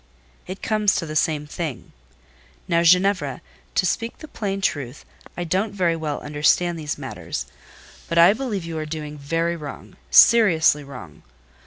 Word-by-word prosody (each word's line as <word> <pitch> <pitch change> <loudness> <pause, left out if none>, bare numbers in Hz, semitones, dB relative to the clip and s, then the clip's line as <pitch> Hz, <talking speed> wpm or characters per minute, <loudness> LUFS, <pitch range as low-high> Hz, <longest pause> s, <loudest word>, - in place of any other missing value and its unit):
"It 185 +1 -8
comes 215 -2 +2
to 170 - -1
the 155 -1 -6
same 150 -1 +1
thing…. 150 -3 -6 0.8
Now, 170 -2 +2
Ginevra, 180 -5 +3 0.4
to - - +2
speak 230 +5 -2
the 310 - -11
plain 200 -8 -4
truth, 145 -8 -3 0.3
I 175 - -2
don't 190 +5 -1
very 175 -4 +1
well 155 -3 -4
understand 155 +3 +1
these 150 -1 -4
matters; - - -6 0.6
but 170 - -1
I 170 +4 +7
believe 220 -7 -4
you 165 -1 -5
are 155 - -4
doing 150 -1 -6
very 165 +4 -1
wrong—seriously 160 +2 +3
wrong. 125 - -11
165 Hz, 150 wpm, -22 LUFS, 150-195 Hz, 0.8 s, I